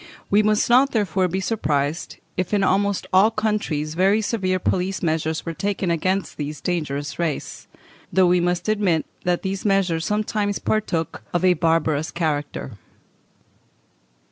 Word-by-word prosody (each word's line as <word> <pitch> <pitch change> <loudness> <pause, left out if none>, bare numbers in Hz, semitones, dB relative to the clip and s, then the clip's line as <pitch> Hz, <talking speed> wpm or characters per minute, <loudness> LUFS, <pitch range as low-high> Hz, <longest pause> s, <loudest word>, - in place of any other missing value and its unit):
We 205 +2 +5
must 215 0 +2
not, 255 +3 +4
therefore, 195 -4 +1
be 185 +2 -2
surprised 155 -7 -1 0.2
if 185 +3 -1
in 200 - +2
almost 200 +1 +1
all 195 +4 +6
countries 210 -9 -1
very 190 +5 +3
severe 195 -4 0
police 185 +1 -1
measures 160 -1 -1
were 165 - -3
taken 195 0 -1
against 185 +4 -1
this 150 0 -4
dangerous 145 -5 -3
race, 165 -4 -3 0.4
though 190 -1 +4
we 180 0 +4
must 175 +1 -1
admit 200 -7 +1 0.2
that 175 -1 +1
these 195 0 -3
measures 190 -5 +1
sometimes 210 0 -1
partook 185 -7 -1
of 175 - +2
a 180 - +6
barbarous 160 -2 +1
character. 145 - -3
185 Hz, 140 wpm, -22 LUFS, 160-200 Hz, 0.4 s, all